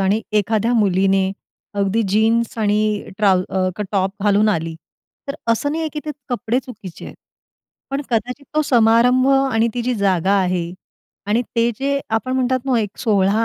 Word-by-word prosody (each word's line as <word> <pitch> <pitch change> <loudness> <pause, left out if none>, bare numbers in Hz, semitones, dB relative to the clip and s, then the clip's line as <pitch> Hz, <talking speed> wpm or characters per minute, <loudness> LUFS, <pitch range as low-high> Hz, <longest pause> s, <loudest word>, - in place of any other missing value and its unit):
आणि 195 +3 +2 0.2
एखाद्या 220 +3 0
मुलीने 195 -2 +2 0.4
अगदी 200 +3 +1
जीन्स 225 +3 +1
आणि 210 0 0
ट्राउ 190 -3 +3
अ, 185 +1 -1
टॉप 195 -1 +1
घालून 210 +1 +3
आली, 165 -4 -1 0.5
तर 275 - -2 0.2
असं 285 +5 -1
नाहीये 320 0 -2
की 300 - -4
ते 305 - -3 0.2
कपडे 245 -1 -1
चुकीचे 210 -9 -10
आहेत. - - -10 0.7
पण 275 +1 -1
कदाचित 250 +5 -2
तो 310 - +3
समारंभ, 245 +1 +4
आणि 270 -4 +3
ती 245 - -2
जी 250 +1 0
जागा 195 -3 +1
आहे 180 -2 -1 0.5
आणि 220 +4 +1
ते 230 +1 +3
जे 280 +1 0
आपण 225 +3 -1
म्हणतात 260 0 +1
ना 255 -3 +2
एक 205 -2 -5
सोहळा 205 0 +2
220 Hz, 160 wpm, -20 LUFS, 195-245 Hz, 0.7 s, समारंभ